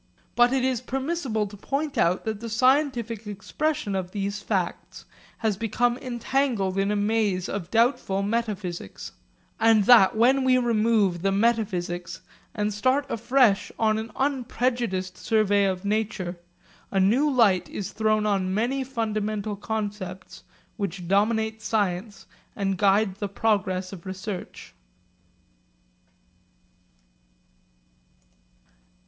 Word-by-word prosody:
But 240 0 +5
it 260 -1 +1
is 255 -3 0
permissible 265 -4 -2
to 205 0 -9
point 280 +8 -3
out 175 +2 +1
that 220 -2 -3
the 230 +1 -6
scientific 235 -2 +1
expression 210 +5 -2
of 190 -2 -2
these 200 0 -3
facts - - -3 0.3
has 220 -4 -1
become 230 +3 +1
entangled 240 -5 -1
in 195 +1 +1
a 210 - +1
maze 205 -3 0
of 190 -3 -5
doubtful 225 -4 +1
metaphysics; 200 - -3 0.5
and 225 -2 +5
that, 220 -2 +6
when 260 +4 +4
we 255 -1 +4
remove 220 -6 +2
the 195 +1 +1
metaphysics 190 -5 -1 0.3
and 210 0 -1
start 260 +7 +1
afresh 235 -2 +2
on 220 -1 +2
an 220 +1 -6
unprejudiced 245 -8 -1
survey 205 -2 +2
of 190 0 -2
nature, 200 -4 -2 0.5
a 195 - 0
new 235 +11 +3
light 220 -9 +3
is 200 - -5
thrown 215 -1 +1
on 195 -3 0
many 255 +5 0
fundamental 215 -4 -2
concepts 205 -3 -5 0.4
which 190 -4 -4
dominate 220 +3 +1
science 205 -1 -2 0.3
and 195 -1 -1
guide 200 -1 +3
the 205 -1 -3
progress 195 -3 0
of 190 0 -10
research. 190 0 -7
215 Hz, 120 wpm, -25 LUFS, 195-235 Hz, 0.5 s, that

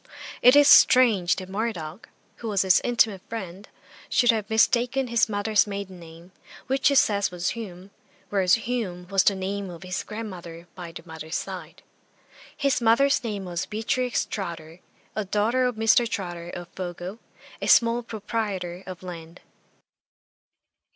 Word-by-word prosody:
It 250 +2 +7
is 290 -1 +7
strange 225 -12 +6
that 185 - -7
Murdoch, 195 -4 -4 0.3
who 230 - -7
was 200 -2 +2
his 190 -1 +4
intimate 225 -5 +2
friend, 195 -3 -7 0.4
should 245 -1 +4
have 215 -1 -3
mistaken 245 +3 +2
his 230 -1 +2
mother's 210 +1 +2
maiden 200 -2 -6
name, 165 +2 -14 0.3
which 265 0 +1
he 280 - +3
says 205 -6 +3
was 180 0 -2
Hume, 195 -4 -8 0.4
whereas 190 -2 +3
Hume 220 -7 -4
was 195 -1 +4
the 200 - +3
name 195 +1 -4
of 175 0 -10
his 185 0 -3
grandmother 175 -6 -8
by 175 -2 -8
the 165 - -10
mother's 160 0 -7
side. - - -6 0.7
His 280 -3 +1
mother's 255 +5 +3
name 205 -4 -4
was 175 0 -4
Beatrix 240 +3 -1
Trotter, 170 -4 -6 0.4
a 215 - -1
daughter 215 +6 +1
of 250 -2 -1
Mr. 225 +2 +3
Trotter, 175 -5 -5
of 175 0 -8
Fogo, 180 +3 -7 0.4
a - - -2
small 235 0 +5
proprietor 205 -5 -4
of 185 -1 -8
land. 170 -1 -9
200 Hz, 150 wpm, -25 LUFS, 180-230 Hz, 0.7 s, It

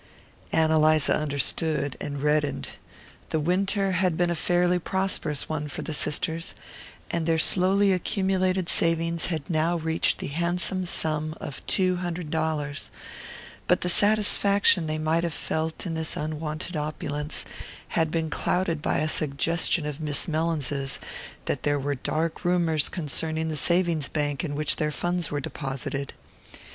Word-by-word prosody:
Ann 160 -1 +3
Eliza 155 -1 +4
understood 150 0 0
and 145 -1 -4
reddened. 150 -1 +1 0.6
The 160 - 0
winter 195 +4 +1
had 180 -2 +1
been 175 -1 +2
a - - 0
fairly 175 +2 +2
prosperous 180 -5 -1
one 150 -1 -3
for - - -5
the 160 - -4
sisters, 160 +3 -1 0.6
and 170 -1 -1
their 165 -1 +3
slowly 190 +4 +4
accumulated 185 0 0
savings 165 0 +1
had 160 -5 -3
now 165 +1 +1
reached 160 0 +1
the - - -5
handsome 175 +4 0
sum 155 -2 -1
of 140 - -6
two 185 -2 +2
hundred 175 -3 -4
dollars; 155 -3 -2 0.8
but 180 - +3
the 180 - 0
satisfaction 205 -3 +4
they 155 0 -1
might 160 +2 +1
have 170 -3 -2
felt 160 +3 -3
in 170 - -3
this 160 -1 -2
unwonted 155 +2 -4
opulence 150 0 -1 0.4
had 160 -2 +1
been 160 -1 -2
clouded 175 -4 0
by - - 0
a 155 - +1
suggestion 155 +3 +1
of 150 +1 -5
Miss 150 -2 0
Mellins's 150 -4 -1 0.5
that - - -1
there 145 0 +1
were 145 +1 -1
dark 155 +4 -2
rumours 170 -4 +2
concerning 160 -1 -2
the 155 - -2
savings 170 -1 +1
bank 145 -1 -1
in 145 -4 -3
which 150 0 +1
their 150 -1 0
funds 175 +1 0
were 145 - -2
deposited. 135 0 -4
160 Hz, 150 wpm, -26 LUFS, 150-175 Hz, 0.8 s, Eliza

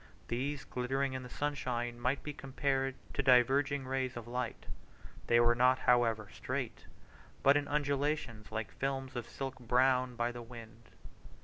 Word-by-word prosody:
These, 135 +4 -2
glittering 135 +2 -1
in 130 - -3
the 125 - -9
sunshine, 125 -4 -2
might 125 +3 0
be 150 - -4
compared 135 -1 -1 0.2
to - - 0
diverging 135 +2 +4
rays 130 -1 -2
of 120 -1 -7
light; 125 0 -3 0.6
they 120 - +5
were 120 0 +5
not, 125 +2 +4
however, 115 -4 +3
straight, - - -4 0.6
but 140 +1 +7
in 145 -1 +1
undulations 140 -6 -1
like 110 -1 -3
films 135 -1 -3
of 120 -2 -4
silk 135 -1 -5
blown 125 +1 +2
by 120 +1 0
the 120 0 -7
wind. 115 -1 -12
130 Hz, 150 wpm, -33 LUFS, 120-135 Hz, 0.6 s, but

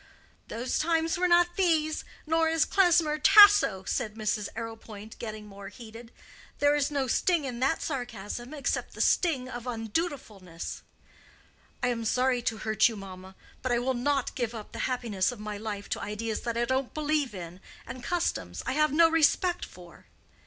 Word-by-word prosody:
"Those 240 +3 -2
times 330 0 +1
were 360 +1 +1
not 350 0 +3
these, 320 -4 +1 0.2
nor 320 +1 +2
is 325 -1 +2
Klesmer 335 -5 +3
Tasso," 410 - +7
said 215 +2 -2
Mrs. 215 -1 -2
Arrowpoint, 225 -2 -8
getting 215 -2 -6
more 200 -1 -10
heated. 230 0 -12 0.5
"There 290 0 +3
is 290 -1 +1
no 280 -2 -1
sting 320 +5 +1
in 245 -3 -5
that 270 +5 +1
sarcasm, 240 - -5
except 295 -3 -3
the - - -11
sting 285 -8 +2
of 245 -1 -7
undutifulness." 225 - -4 1.0
"I 245 - +3
am 235 -2 -2
sorry 250 +2 +1
to 230 -1 -2
hurt 220 +1 +4
you, 225 - -6
mamma. 190 -1 -10 0.3
But 255 - -2
I 240 - +3
will 255 +2 0
not 270 +2 0
give 240 -3 -3
up 215 -2 -8
the - - -8
happiness 225 -6 -1
of 245 - -10
my 210 -1 -5
life 205 -1 -5
to - - -2
ideas 215 +2 -3
that 235 -1 -3
I 240 - +1
don't 260 +1 -2
believe 300 -6 0
in 175 0 -8 0.3
and 255 - -8
customs 350 +5 -2
I - - -1
have 305 +2 +2
no 330 +3 +6
respect 330 +3 +2
for." 175 -2 -15
245 Hz, 175 wpm, -28 LUFS, 215-305 Hz, 1.0 s, Tasso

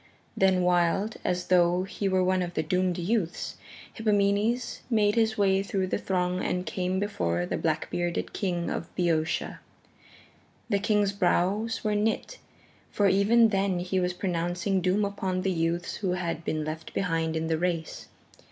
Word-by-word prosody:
Then 190 -1 +3
wild, 180 +4 +1
as 180 0 -1
though 180 0 +3
he 195 +1 -2
were 185 -1 +2
one 185 0 +2
of 175 -1 -4
the 155 - 0
doomed 180 +2 0
youths, 180 -1 -2 0.4
Hippomenes 215 +2 +1
made 210 -3 +3
his 220 -1 +1
way 195 -1 +3
through 195 -1 -1
the 185 - -2
throng 180 -1 -1
and 180 0 -1
came 180 +3 -1
before 90 - -1
the - - -2
black 155 -1 -1
bearded 175 -1 -2
King 175 -4 -2
of 170 - -4
Boeotia. 165 -3 0 1.1
The 200 - +2
king's 205 -1 +2
brows 200 +4 0
were 215 -1 +1
knit, 220 - -1 0.5
for 205 - +2
even 215 +4 +5
then 195 -2 +1
he 180 +2 -1
was 180 0 0
pronouncing 180 +1 -1
doom 190 +3 +2
upon 190 -2 -2
the 195 - +1
youths 170 0 -1
who 190 -5 -1
had 170 -2 -3
been 155 -1 -2
left 155 +1 -6
behind 165 -3 0
in 160 0 -1
the 160 -1 0
race. 170 -2 -2
185 Hz, 160 wpm, -27 LUFS, 175-200 Hz, 1.1 s, even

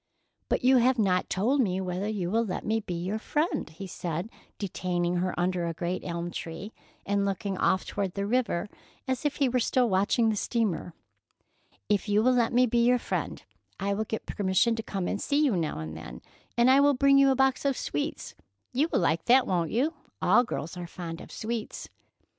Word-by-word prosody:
"But - - 0
you 260 +1 +6
have 250 +1 +3
not 185 -4 +1
told 245 +9 +2
me 190 -5 0
whether 185 +1 -2
you 195 -5 -2
will 230 +2 +2
let 200 -5 -4
me 220 +1 +1
be 180 -5 -5
your 185 +6 -3
friend," 305 +8 -1
he 170 +5 -9
said, 175 +2 -4 0.3
detaining 180 -2 -1
her 180 0 -1
under 175 -1 0
a 165 - -3
great 175 +2 -2
elm 170 0 -4
tree, 170 +7 -6 0.3
and 200 0 +1
looking 195 0 -2
off 185 - +2
toward 195 -3 -3
the 200 0 -1
river, 215 -4 0 0.4
as 260 +2 -2
if 295 - +1
he 280 - +2
were 250 0 +1
still 245 +1 +2
watching 205 +3 +2
the 215 - 0
steamer. 205 -6 -1 0.9
"If 205 0 0
you 210 +1 +3
will 255 +1 +4
let 240 -2 +2
me 250 +1 +4
be 235 0 +2
your 250 +1 +4
friend, - - -4 0.4
I 200 +1 0
will 215 +2 -1
get 220 - -4
permission 200 +4 +1
to 225 - -3
come 195 -4 -3
and 205 - -2
see 290 +1 +2
you 250 -8 +2
now 160 - -1
and 80 0 -6
then, - - -9 0.3
and 240 +2 +5
I 270 - +6
will 285 0 +5
bring 275 +1 +5
you 275 0 +6
a 265 - +3
box 265 0 +2
of 275 -2 +1
sweets. 145 - -3 0.4
You 280 +6 +2
will - - +2
like 165 +1 +1
that, 250 +1 +5
won't 170 -3 0
you? 275 +8 +1 0.3
All 215 +7 +4
girls 170 -9 -5
are 175 -1 -5
fond 165 -1 -7
of - - -12
sweets." 225 0 -5
205 Hz, 210 wpm, -28 LUFS, 180-245 Hz, 0.9 s, you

